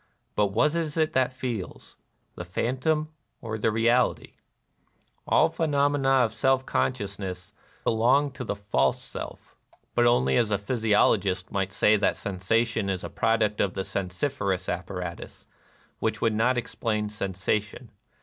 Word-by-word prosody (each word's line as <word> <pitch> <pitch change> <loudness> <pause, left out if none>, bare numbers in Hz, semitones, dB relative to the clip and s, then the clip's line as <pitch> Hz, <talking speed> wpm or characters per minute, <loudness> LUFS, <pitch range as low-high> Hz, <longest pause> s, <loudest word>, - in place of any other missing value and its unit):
But 105 - +3
what 110 +10 +2
is 165 -2 -2
it 155 -1 +1
that 130 -1 +2
feels? 120 -7 -6 0.2
— - - -45
the - - -6
phantom 130 - -1 0.3
or 110 -1 -5
the 110 - +2
reality? 115 +3 +1 0.9
All - - +5
phenomena 145 -4 +1 0.2
of 110 - -3
/SeZf 130 +3 +1
consciousness 100 -6 -3 0.3
belong 130 +6 +3
to 130 - -7
the 105 - -3
false 100 -9 +1
self, - - -9 0.2
— - - -42
but 120 0 +4
only 65 - +3
as 115 - +2
a 105 - +2
physiologist 100 -4 +1
might 95 -1 -1
say 105 +2 +4
that 100 - +1
sensation 110 +2 0
is 95 0 -2
a - - -6
product 110 -2 +1
of 95 - 0
the 95 - -2
sensiferous 95 +1 -2
apparatus, 90 -1 -5 0.5
which - - -1
would 115 -1 +1
not 120 +4 +2
ex 120 - -4
plain 105 -2 -1
sensation. 105 +1 -3
110 Hz, 150 wpm, -26 LUFS, 95-125 Hz, 0.9 s, All